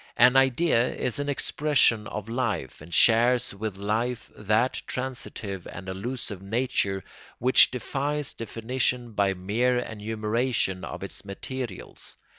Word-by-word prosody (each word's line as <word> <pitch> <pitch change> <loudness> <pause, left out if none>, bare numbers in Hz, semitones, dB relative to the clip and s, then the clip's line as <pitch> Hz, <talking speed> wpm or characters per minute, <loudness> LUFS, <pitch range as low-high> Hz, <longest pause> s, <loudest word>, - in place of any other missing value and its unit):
An 125 +1 +6
idea 135 -1 +3
is 125 - -2
an 145 0 -2
expression 140 -6 +2
of 105 -2 -5
life, 115 - -2
and 80 +3 -12
shares 120 +6 +4
with 100 -1 -4
life 110 +5 -2
that 110 +5 +1
transitive 115 -7 -4
and 95 - -9
elusive 105 +1 -5
nature 100 -2 0 0.3
which 130 +2 +7
defies 140 +3 -2
definition 120 +2 -2
by 100 -2 +1
mere 115 +7 +1
enumeration 110 -2 -1
of - - -6
its - - -6
materials. 110 +2 -6
115 Hz, 120 wpm, -26 LUFS, 100-125 Hz, 0.3 s, which